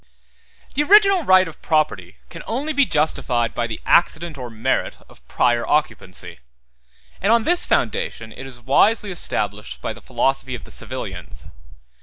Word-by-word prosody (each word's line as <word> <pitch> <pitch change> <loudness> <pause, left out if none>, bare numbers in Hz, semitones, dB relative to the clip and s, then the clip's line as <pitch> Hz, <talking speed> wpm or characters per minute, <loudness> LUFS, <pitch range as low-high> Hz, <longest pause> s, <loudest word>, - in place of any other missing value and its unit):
The 285 - +1
original 395 +3 +6
right 185 - +5
of 160 - -12
property 150 - 0 0.2
can - - -8
only 280 +7 -2
be 280 -2 +3
justified 135 -6 0
by 120 - -1
the 110 - -6
accident 170 -1 +2
or 125 -3 -7
merit 110 -1 -1
of - - -20
prior 120 -1 +1
occupancy; 90 - -2 0.8
and 200 - +2
on 230 -1 +4
this 350 +5 +2
foundation 110 -1 -1
it 130 - -9
is 125 -2 -7
wisely 200 - +2
established 180 - -3
by - - -4
the - - -14
philosophy 135 -1 -1
of 120 - -9
the - - -13
civilians. - - -7
155 Hz, 155 wpm, -21 LUFS, -, 0.8 s, original